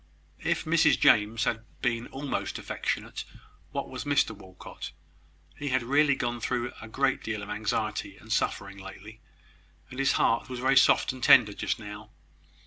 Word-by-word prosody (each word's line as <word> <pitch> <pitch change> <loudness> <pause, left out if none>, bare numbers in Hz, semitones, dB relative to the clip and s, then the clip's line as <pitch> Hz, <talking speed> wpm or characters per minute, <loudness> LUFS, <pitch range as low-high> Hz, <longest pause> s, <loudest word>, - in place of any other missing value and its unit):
If - - 0
Mrs 160 -1 +4
James 110 +1 +4
had 110 -1 -1 0.2
been 115 0 0
almost 135 +1 -4
affectionate, - - -3 0.5
what - - -3
was - - -6
Mr - - +1
Walcot? 95 -4 -10 0.6
He 145 - -6
had 130 -2 +1
really 140 +3 +3
gone 120 -2 -2
through 120 +1 -2
a 110 - -8
great 135 +4 0
deal 110 -2 -4
of 105 - -7
anxiety 105 -1 -2
and 110 +1 -5
suffering 100 -3 -1
lately, 100 +3 -11 0.7
and 130 - -7
his 135 -2 +3
heart 115 +3 +2
was 125 - -5
very 130 +2 +2
soft 135 - +5
and 130 - -10
tender 105 -3 +7
just - - -2
now. 105 0 -9
115 Hz, 160 wpm, -28 LUFS, 105-130 Hz, 0.7 s, tender